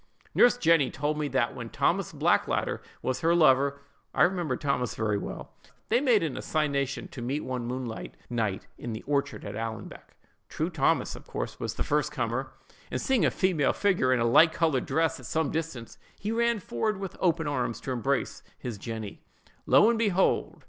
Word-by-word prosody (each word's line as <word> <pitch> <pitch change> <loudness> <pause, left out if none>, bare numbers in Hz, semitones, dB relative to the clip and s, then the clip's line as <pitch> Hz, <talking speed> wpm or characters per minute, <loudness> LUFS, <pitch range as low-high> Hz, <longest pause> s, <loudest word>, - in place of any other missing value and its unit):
"Nurse 245 0 +5
Jenny 165 - +4
told 150 +2 -2
me 150 - 0
that 130 -4 0
when - - -6
Thomas - - 0
Blackadder - - +1 0.2
was 130 +5 -1
her 165 +1 +3
lover 140 -3 +4 0.3
(I - - +5
remember 175 -8 +1
Thomas 140 -5 -1
very 105 -2 0
well), - - -7 0.4
they 235 +3 +3
made 240 -9 +4
an 155 -5 -2
assignation 140 -3 -1
to 125 - -8
meet 135 +5 -2
one 125 -2 -4
moonlight 120 - -5
night 110 -5 -2
in 120 - -5
the 110 - -6
orchard 140 -1 -1
at 100 - -5
Allanbank. 115 0 -7 0.3
True - - -2
Thomas, - - +1
of - - -12
course, - - -5
was - - -3
the - - -1
first 150 0 0
comer; 130 -1 -2 0.4
and, - - -2
seeing 255 - +2
a - - +4
female 175 -7 +1
figure, 185 -11 +2
in 130 - +3
a 115 - +2
light 160 +8 +6
colored 155 -6 +1
dress, 160 0 +1
at - - -9
some 160 -2 0
distance, 155 -8 -5 0.2
he 210 - -3
ran 235 0 +2
forward 190 - -2
with 195 -2 -5
open 165 -3 +1
arms 125 -6 -1
to 135 - -4
embrace 135 +3 -1 0.2
his 120 -6 -6
Jenny. 110 -2 -6 0.5
Lo, - - +6
and 230 -1 +2
behold! 195 -4 +1
140 Hz, 185 wpm, -28 LUFS, 120-165 Hz, 0.5 s, light